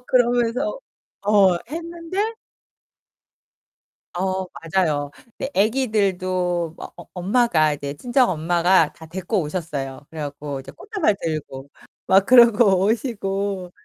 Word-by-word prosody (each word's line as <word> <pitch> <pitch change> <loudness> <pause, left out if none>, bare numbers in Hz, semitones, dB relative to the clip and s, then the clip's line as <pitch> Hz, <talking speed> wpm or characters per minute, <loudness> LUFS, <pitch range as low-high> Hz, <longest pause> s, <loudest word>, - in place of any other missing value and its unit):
그러면서 245 - +1 0.4
어 200 -3 +5 0.2
했는데. 340 +6 -3 1.8
어 190 +1 -1 0.2
맞아요. 155 -5 0
근데 240 +3 -7
애기들도 185 -7 0
막 - - -9
어 175 - -10
엄마가 180 -5 +2
이제 140 -1 -5
친정 245 - +2
엄마가 170 0 +2
다 160 - -13
데리고 185 +4 -2
오셨어요. 150 -4 -5
그래갖고 145 -2 -6
이제 - - -11
꽃다발 395 - -1
들고 140 -4 -5 0.4
막 195 +1 +5
그러고 230 -6 +6
오시고. 200 -5 -2
190 Hz, 245 characters per minute, -22 LUFS, 165-235 Hz, 1.8 s, 그러고